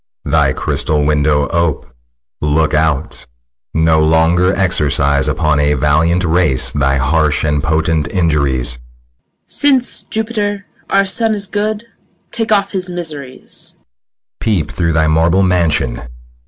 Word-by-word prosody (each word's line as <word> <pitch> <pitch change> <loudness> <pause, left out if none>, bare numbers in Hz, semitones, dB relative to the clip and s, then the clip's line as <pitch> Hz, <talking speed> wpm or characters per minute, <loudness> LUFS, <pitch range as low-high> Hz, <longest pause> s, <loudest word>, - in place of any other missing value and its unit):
Thy - - +2
crystal 75 -1 -1
window 75 -1 +1
ope; 85 -4 -1 0.6
look 75 +1 0
out; 75 -4 -1 0.5
No 80 -1 +3
longer 80 +3 +2
exercise 70 -6 +2
Upon 75 0 0
a 75 0 +1
valiant 75 +6 +1
race 80 -7 +2
thy 70 -1 0
harsh 75 +2 +1
And 75 -2 0
potent 80 0 0
injuries. 70 -9 +1
MOTHER. - - -16
Since, 270 -4 0
Jupiter, 210 -2 -3 0.2
our 195 0 +2
son 220 +2 0
is 200 -1 -4
good, 210 +2 -3 0.5
Take 225 -2 -3
off 200 -2 +1
his 185 -2 -4
miseries. 150 -7 -8
SICILIUS. - - -9 0.6
Peep 90 -9 -1
through 85 -3 -1
thy 80 0 +2
marble 80 +4 +2
mansion. 80 -9 +1
80 Hz, 125 wpm, -15 LUFS, -, 0.6 s, No